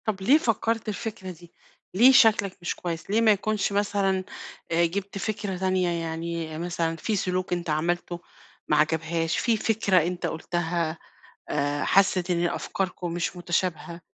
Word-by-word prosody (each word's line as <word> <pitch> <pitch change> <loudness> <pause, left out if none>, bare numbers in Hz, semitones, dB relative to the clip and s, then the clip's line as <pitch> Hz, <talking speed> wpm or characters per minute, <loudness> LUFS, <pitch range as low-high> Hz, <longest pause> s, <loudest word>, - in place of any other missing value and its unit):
طب 205 -3 -2
ليه 260 +10 +5
فَكَّرت 230 -4 -1
الفكرة 205 -2 -5
دي؟ 170 0 -15 0.4
ليه 240 +8 +7
شكلك 215 -7 +4
مش 175 - -2
كويس، 170 -1 -5
ليه 220 +3 +2
ما 225 -1 +6
يكونش 210 0 0
مثلًا 200 -2 +1 0.5
آآ 170 +1 +3
جِبت 195 +3 -4
فكرة 205 -2 -3
تانية، 185 -1 +1
يعني 165 -1 -4
مثلًا 170 -1 -2
في 210 +6 -2
سُلوك 185 -1 -1
أنت 175 -1 -3
عملتُه 175 +3 -1 0.5
ما 150 - +2
عجبهاش، 160 +1 0
في 230 -3 +2
فكرة 210 -3 +1
أنت 180 0 -3
قُلتها 165 0 -2 0.5
آآ 145 0 -1
حَسِّت 185 -2 +3
إن 175 0 +1
أفكاركم 180 -1 -3
مش 175 +1 -2
مُتشابهة، 175 -1 -2
180 Hz, 150 wpm, -26 LUFS, 170-200 Hz, 0.5 s, ليه